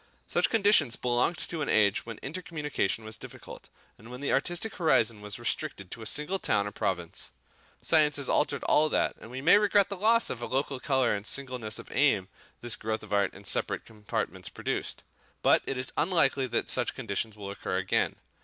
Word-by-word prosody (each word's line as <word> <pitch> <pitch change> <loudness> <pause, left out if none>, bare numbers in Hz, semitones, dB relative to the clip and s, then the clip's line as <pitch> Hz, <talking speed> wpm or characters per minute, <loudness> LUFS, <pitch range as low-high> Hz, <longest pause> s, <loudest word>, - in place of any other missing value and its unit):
Such - - +1
conditions 200 - +4
belonged 125 +7 0
to 165 -2 -4
an 145 - -2
age 105 0 +3
when 115 -2 -6
intercommunication 150 - -3
was 110 0 -4
difficult, - - -11 0.3
and 110 +3 -13
when 125 0 -8
the 140 - -1
artistic 175 +9 0
horizon 115 - +2
was 105 -1 -7
restricted 120 -5 -3
to 115 - -7
a 110 - -4
single 150 - 0
town 100 - +1
or 100 - -4
province. 90 -5 -3 0.5
Science 150 -2 +4
has 140 -2 0
altered 140 - +1
all 155 +1 +3
that, - - +1
and 110 - -10
we 130 +2 -6
may 180 +8 +6
regret 205 -1 +3
the 200 - -3
loss 225 +4 +3
of 120 - -5
local 135 +2 -2
colour 130 -3 +1
and 100 0 -4
singleness 125 -6 -1
of - - -10
aim 110 -9 +2 0.3
this 120 -1 0
growth 110 0 -3
of 105 -1 -7
art 100 -1 +2
in 100 - -12
separate 100 - 0
compartments 105 -2 -4
produced; - - -4 0.4
but - - +5
it 135 - -2
is 130 - 0
unlikely 145 -6 +2
that - - -1
such - - +1
conditions 105 +2 -3
will 100 -1 -6
occur 100 - -3
again. - - 0
130 Hz, 190 wpm, -29 LUFS, 110-155 Hz, 0.5 s, may